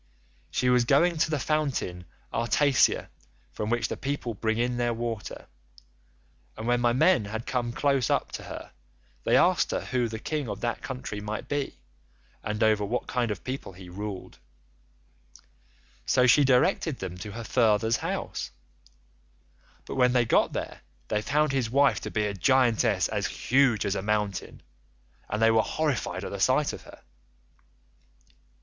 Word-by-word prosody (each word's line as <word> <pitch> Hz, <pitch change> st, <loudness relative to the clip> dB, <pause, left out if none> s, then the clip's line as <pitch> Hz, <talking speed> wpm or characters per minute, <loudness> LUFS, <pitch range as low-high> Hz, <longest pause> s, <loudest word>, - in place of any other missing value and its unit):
She 125 Hz, -, 0 dB
was 125 Hz, -1 st, +4 dB
going 160 Hz, +7 st, +3 dB
to 155 Hz, -, +2 dB
the 155 Hz, -, 0 dB
fountain 135 Hz, -, -1 dB, 0.3 s
Artacia 130 Hz, +4 st, +2 dB, 0.4 s
from 105 Hz, -, -3 dB
which 120 Hz, 0 st, +1 dB
the -, -, -4 dB
people 135 Hz, -4 st, -3 dB
bring 110 Hz, +1 st, -1 dB
in 120 Hz, +1 st, 0 dB
their 120 Hz, -1 st, 0 dB
water, 115 Hz, -2 st, -5 dB, 1.1 s
and 110 Hz, -, -6 dB
when 120 Hz, 0 st, +2 dB
my 120 Hz, -1 st, +3 dB
men 150 Hz, -, +3 dB
had 110 Hz, +3 st, -5 dB
come 120 Hz, -2 st, -1 dB
close 140 Hz, 0 st, +1 dB
up -, -, 0 dB
to -, -, -6 dB
her, -, -, -8 dB, 0.5 s
they -, -, +4 dB
asked -, -, +3 dB
her -, -, -1 dB
who 125 Hz, -2 st, 0 dB
the 110 Hz, 0 st, -5 dB
king 145 Hz, +2 st, -3 dB
of 100 Hz, -1 st, -4 dB
that 120 Hz, -1 st, -2 dB
country 125 Hz, -6 st, -5 dB
might 105 Hz, 0 st, -5 dB
be, 145 Hz, -, -3 dB, 0.6 s
and 105 Hz, +1 st, -2 dB
over 110 Hz, -1 st, +3 dB
what 115 Hz, +5 st, -2 dB
kind 120 Hz, -2 st, -1 dB
of 105 Hz, -, -4 dB
people 130 Hz, -6 st, -5 dB
he 90 Hz, 0 st, -12 dB
ruled; 100 Hz, +1 st, -7 dB, 1.7 s
so 125 Hz, -, +4 dB
she 145 Hz, +4 st, +6 dB
directed 135 Hz, +3 st, +2 dB
them 90 Hz, -2 st, -6 dB
to 100 Hz, +3 st, -7 dB
her 115 Hz, +1 st, -6 dB
father's 110 Hz, 0 st, +2 dB
house, -, -, -4 dB, 1.4 s
but -, -, -6 dB
when 125 Hz, -1 st, +3 dB
they 120 Hz, -2 st, +3 dB
got -, -, +3 dB
there -, -, -5 dB, 0.3 s
they 105 Hz, -, 0 dB
found 150 Hz, +5 st, +1 dB
his 130 Hz, -4 st, 0 dB
wife 140 Hz, +3 st, +3 dB
to -, -, -5 dB
be 105 Hz, -1 st, 0 dB
a 105 Hz, -, -2 dB
giantess 120 Hz, +4 st, +3 dB
as -, -, -1 dB
huge 130 Hz, -4 st, +2 dB
as 100 Hz, -, 0 dB
a 100 Hz, -, -2 dB
mountain, 105 Hz, -1 st, -2 dB, 0.7 s
and 105 Hz, -, -2 dB
they 115 Hz, 0 st, +5 dB
were 115 Hz, 0 st, +4 dB
horrified 150 Hz, 0 st, -2 dB
at -, -, -5 dB
the -, -, -5 dB
sight -, -, +2 dB
of -, -, -8 dB
her. -, -, -14 dB
120 Hz, 165 wpm, -27 LUFS, 105-135 Hz, 1.7 s, she